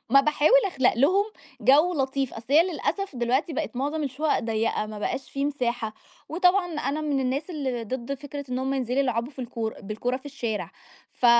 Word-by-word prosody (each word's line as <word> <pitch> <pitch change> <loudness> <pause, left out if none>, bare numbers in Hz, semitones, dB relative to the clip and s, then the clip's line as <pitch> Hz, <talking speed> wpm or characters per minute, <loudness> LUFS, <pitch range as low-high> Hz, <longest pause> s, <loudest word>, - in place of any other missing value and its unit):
ما 275 - +8
باحاول 305 - +5
أخلق 265 -9 +2
لهم 360 +11 +4 0.4
جو 305 +7 +5
لطيف، 270 -2 -1
أصل 225 - -8
هي 310 +3 +8
للأسف 375 -1 -2
دلوقتي 250 +7 +1
بَقِت 310 -3 -3
مُعظم 290 +4 -1
الشقق 285 +2 0
ضيّقة، 225 -1 0
ما 215 0 -7
بقاش 260 +5 -3
في 275 0 -1
مساحة، 245 -6 -1 0.3
وطبعًا 360 +3 +3
أنا 295 +3 -1
من 290 -3 0
الناس 270 +6 -1
اللي 260 -7 -2
ضد 255 +3 -3
فكرة 285 +1 -7
إن 250 - -1
هُم 265 +1 -1
ينزلوا 255 -1 -1
يلعبوا 250 -2 +1
في 265 - -23
الكور 230 -3 -3
بالكورة 220 +5 -2
في 270 - -11
الشارع، 235 -6 -3 0.4
ف 245 - 0
270 Hz, 185 wpm, -26 LUFS, 245-300 Hz, 0.4 s, ما